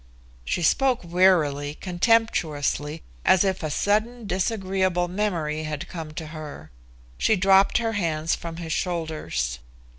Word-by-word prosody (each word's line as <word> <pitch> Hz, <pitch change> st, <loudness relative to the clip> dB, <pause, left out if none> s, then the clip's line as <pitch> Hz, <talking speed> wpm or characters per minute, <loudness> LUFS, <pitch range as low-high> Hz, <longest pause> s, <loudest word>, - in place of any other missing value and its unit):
She 115 Hz, -, -2 dB
spoke 260 Hz, -, +3 dB
wearily, 165 Hz, -5 st, +2 dB
contemptuously, 165 Hz, -, 0 dB, 0.2 s
as 185 Hz, 0 st, +5 dB
if 190 Hz, -1 st, 0 dB
a 155 Hz, -, -2 dB
sudden 215 Hz, +8 st, 0 dB
disagreeable 190 Hz, -2 st, 0 dB
memory 175 Hz, -6 st, -1 dB
had 150 Hz, -1 st, -4 dB
come 160 Hz, -3 st, -7 dB
to 160 Hz, -, -5 dB
her. 150 Hz, -, -9 dB, 0.5 s
She 220 Hz, -, +3 dB
dropped 195 Hz, +1 st, +4 dB
her 230 Hz, -1 st, 0 dB
hands 165 Hz, -5 st, 0 dB
from 165 Hz, -1 st, -5 dB
his 165 Hz, -2 st, -4 dB
shoulders. 155 Hz, -, -2 dB
175 Hz, 125 wpm, -25 LUFS, 155-195 Hz, 0.5 s, as